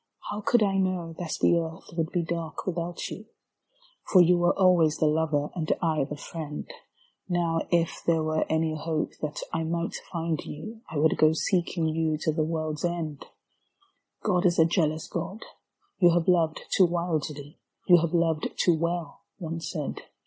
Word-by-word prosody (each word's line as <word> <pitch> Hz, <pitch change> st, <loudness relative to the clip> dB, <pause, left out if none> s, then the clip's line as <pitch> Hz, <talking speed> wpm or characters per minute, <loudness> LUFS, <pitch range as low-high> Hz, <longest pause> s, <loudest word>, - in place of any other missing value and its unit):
How 210 Hz, +1 st, -4 dB
could 230 Hz, +1 st, +3 dB
I 195 Hz, -1 st, +1 dB
know 185 Hz, -3 st, -1 dB
that 170 Hz, -3 st, -3 dB
the 170 Hz, -, +4 dB
earth 160 Hz, 0 st, -7 dB
would 165 Hz, -1 st, -1 dB
be 175 Hz, -, 0 dB
dark 165 Hz, -2 st, -4 dB
without 175 Hz, -1 st, -3 dB
you? 215 Hz, +2 st, -8 dB, 0.8 s
For 190 Hz, -, +7 dB
you 175 Hz, 0 st, +6 dB
were 175 Hz, 0 st, +2 dB
always 175 Hz, -5 st, +4 dB
the -, -, +2 dB
lover 150 Hz, -1 st, +1 dB
and 160 Hz, -3 st, -2 dB
I 155 Hz, -5 st, +1 dB
the 150 Hz, -, -6 dB
friend. 150 Hz, -1 st, -6 dB, 0.6 s
Now 170 Hz, -2 st, +1 dB
if 170 Hz, -1 st, +1 dB
there 165 Hz, -2 st, +3 dB
were 155 Hz, 0 st, +1 dB
any 160 Hz, 0 st, +1 dB
hope 155 Hz, 0 st, -2 dB
that 155 Hz, -1 st, -3 dB
I 165 Hz, -, 0 dB
might 170 Hz, +1 st, -2 dB, 0.2 s
find 165 Hz, -2 st, -2 dB
you 220 Hz, +9 st, -8 dB
I 160 Hz, -, -4 dB
would 155 Hz, +2 st, +2 dB
go 155 Hz, 0 st, +6 dB
seeking 170 Hz, 0 st, 0 dB
you 160 Hz, -1 st, 0 dB
to 155 Hz, -, +1 dB
the 160 Hz, -, 0 dB
world's 155 Hz, -1 st, -3 dB
end. 165 Hz, -4 st, -3 dB, 1.0 s
*'God 185 Hz, -3 st, +3 dB
is 175 Hz, -, +1 dB
a 160 Hz, -, +6 dB
jealous 160 Hz, -2 st, 0 dB
God. 180 Hz, +5 st, -5 dB, 0.6 s
You 175 Hz, -2 st, +7 dB
have 170 Hz, -2 st, +1 dB
loved 165 Hz, -3 st, +2 dB
too 185 Hz, -, +6 dB
wildly, 155 Hz, -3 st, -3 dB, 0.3 s
You 180 Hz, -2 st, +8 dB
have 170 Hz, +1 st, -1 dB
loved 165 Hz, -2 st, +1 dB
too 175 Hz, -, +4 dB
well!" 170 Hz, -1 st, -3 dB, 0.2 s
one 165 Hz, -1 st, -4 dB
said. 160 Hz, -3 st, -4 dB
165 Hz, 175 wpm, -27 LUFS, 155-175 Hz, 1.0 s, You